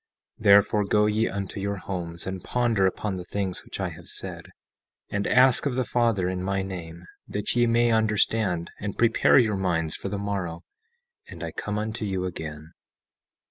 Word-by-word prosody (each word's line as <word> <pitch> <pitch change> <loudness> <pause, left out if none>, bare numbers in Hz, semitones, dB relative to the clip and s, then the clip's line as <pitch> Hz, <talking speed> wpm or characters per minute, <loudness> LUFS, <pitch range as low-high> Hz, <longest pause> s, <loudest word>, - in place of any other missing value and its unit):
17:3 - - -12
Therefore, 100 +1 +6
go 105 +1 +3
ye 105 +2 +2
unto 100 0 -4
your 100 +1 -2
homes, 85 -3 -5
and 95 -1 -5
ponder 115 -6 +2
upon 95 +1 -2
the 90 - -5
things 95 0 -3
which - - -8
I - - -1
have - - -12
said, - - -4 0.6
and 100 0 -1
ask 130 +2 +5
of 130 - -1
the 130 -1 0
Father, 115 -6 +1
in 90 0 -2
my 95 +1 -1
name, 85 -3 -7 0.2
that 105 +3 -2
ye 120 0 +4
may 120 0 +3
understand, 105 -5 +1
and 100 -1 -4
prepare 115 -1 +4
your 110 -6 +3
minds 85 -4 0
for 100 - -5
the 100 - -3
morrow, 95 -4 -3 0.6
and - - -9
I - - -4
come 105 0 -4
unto 110 +1 -3
you 95 -3 -1
again. 80 -3 -6
100 Hz, 180 wpm, -26 LUFS, 90-110 Hz, 0.6 s, Therefore